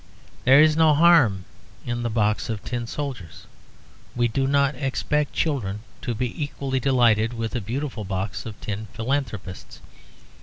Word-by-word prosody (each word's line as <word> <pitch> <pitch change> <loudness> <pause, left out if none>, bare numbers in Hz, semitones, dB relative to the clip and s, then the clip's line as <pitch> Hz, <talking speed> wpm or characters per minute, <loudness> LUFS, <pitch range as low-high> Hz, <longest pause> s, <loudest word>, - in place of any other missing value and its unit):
There 135 +2 +7
is 155 0 +6
no 160 -2 +5
harm 145 - +5 0.4
in 120 0 -2
the 120 - -1
box 110 -1 0
of 110 -2 -4
tin 120 -2 -4
soldiers; 125 - -6 0.7
we 120 -1 +2
do 135 +3 -1
not 140 0 +2
expect 145 +1 -1
children 105 -10 -1 0.2
to 120 - -3
be 125 +5 -3
equally 135 -2 -3
delighted 120 -4 +3
with 115 -1 -4
a 120 - -1
beautiful 120 +2 -4
box 95 +3 -4
of 110 -1 -9
tin 105 +1 -5
philanthropists. 110 -6 -4
120 Hz, 150 wpm, -24 LUFS, 110-140 Hz, 0.7 s, There